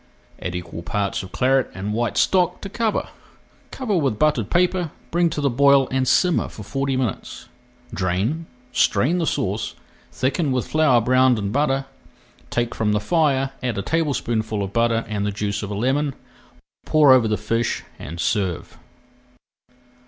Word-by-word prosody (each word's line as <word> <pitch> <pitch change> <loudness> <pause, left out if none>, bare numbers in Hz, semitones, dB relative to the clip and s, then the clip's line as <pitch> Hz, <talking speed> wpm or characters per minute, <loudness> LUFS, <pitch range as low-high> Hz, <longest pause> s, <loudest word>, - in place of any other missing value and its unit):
Add 90 -1 -4
equal 85 -1 -6
parts 100 +3 -2
of 95 -1 -10
Claret 130 0 +2
and 100 +3 -3
white 120 +2 -1
stock 180 -2 +2
to 195 - -6
cover. 225 +1 -1 0.6
Cover 245 -7 -2
with 135 - +1
buttered 120 -7 +1
paper, 180 -1 +1 0.2
bring 170 0 +2
to 150 - -3
the 140 - +2
boil, 140 +1 +5
and 130 0 0
simmer 180 +4 +3
for 105 - -10
forty 135 +4 -2
minutes. 125 -6 -4 0.5
Drain, 105 - -1 0.2
strain 155 +7 +2
the 165 - 0
sauce, 100 +3 -2 0.4
thicken 140 +3 0
with 130 -1 -1
flour 155 -6 +4
browned 130 +1 +4
in 100 -1 -2
butter, 135 0 +1 0.6
take 120 -1 -1
from 105 -1 0
the 105 - +2
fire, 135 +1 +1
add 125 -4 -2
a 100 - -2
tablespoonful 115 - -1
of 100 0 -6
butter 115 -1 +1
and 105 -2 -2
the 105 - -1
juice 100 0 -2
of 100 - -5
a 105 - -4
lemon, 135 +5 0 0.7
pour 150 -3 +5
over 125 -3 +4
the 105 0 0
fish 115 +2 -1 0.2
and 85 +4 -8
serve. 95 0 -2
125 Hz, 160 wpm, -22 LUFS, 105-145 Hz, 0.7 s, boil